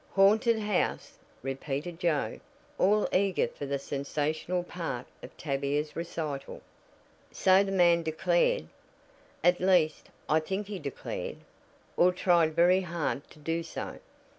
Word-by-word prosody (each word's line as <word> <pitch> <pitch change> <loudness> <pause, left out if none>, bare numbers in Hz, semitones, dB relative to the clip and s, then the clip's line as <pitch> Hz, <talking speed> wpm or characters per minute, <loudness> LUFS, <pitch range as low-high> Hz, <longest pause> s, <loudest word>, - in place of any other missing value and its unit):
"Haunted 215 +4 +5
house!" 210 -3 -1 0.2
repeated 140 +5 -4
Joe, 165 -5 0 0.4
all 210 +3 +3
eager 195 0 +2
for 145 - -7
the 140 0 -1
sensational 150 +6 -2
part 165 -9 -5 0.2
of - - -12
Tavia's 145 +1 -2
recital. 160 -4 -5 0.7
"So 190 +1 +4
the 195 - -3
man 175 -3 +4
declared. 165 - +1 0.8
At 175 +1 +4
least, 180 -4 +2 0.2
I 155 - +4
think 190 +6 -3
he 200 -1 -6
declared, 140 -4 -5 0.6
or 180 +1 +5
tried 170 -3 +2
very 180 +2 +5
hard 170 -5 -3
to - - -17
do 165 +2 -2
so. 165 - -6
170 Hz, 125 wpm, -29 LUFS, 150-185 Hz, 0.8 s, Haunted